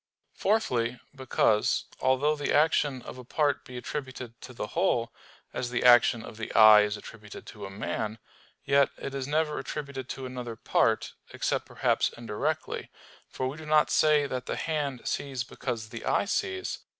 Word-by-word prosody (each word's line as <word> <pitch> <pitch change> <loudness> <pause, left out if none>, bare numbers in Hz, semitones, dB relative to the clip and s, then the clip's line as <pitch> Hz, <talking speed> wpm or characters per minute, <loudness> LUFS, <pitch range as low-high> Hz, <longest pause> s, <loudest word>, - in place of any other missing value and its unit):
Fourthly, 125 - 0 0.2
because, 120 -5 +2
although 135 +4 +2
the 145 -1 -2
action 145 -4 +2
of 130 - -9
a - - -8
part 145 +2 0
be 125 - -9
attributed 130 -3 -6
to - - -9
the 120 - -4
whole, 160 -10 +1 0.4
as 125 - -3
the 120 - -1
action 120 -2 +6
of 110 - -10
the 110 - -5
eye 110 -1 +9
is 105 0 -1
attributed 105 -2 -11
to 105 -2 -8
a - - -9
man; 110 +2 -3 0.5
yet 140 0 +4
it 135 - -6
is 135 -1 -3
never 150 +1 0
attributed 140 -3 -6
to 135 - -5
another 125 -2 -6
part, - - +1 0.2
except - - -1
perhaps - - +1
indirectly; 120 +8 -3 0.4
for 130 - -3
we 135 +3 -5
do 155 - -9
not 150 0 +4
say 150 -2 +4
that 125 -2 -4
the - - -2
hand 145 -5 -2
sees 135 -3 -2
because 120 -3 -5
the 115 -1 -8
eye - - +1
sees. 380 - -2
130 Hz, 170 wpm, -28 LUFS, 115-150 Hz, 0.5 s, eye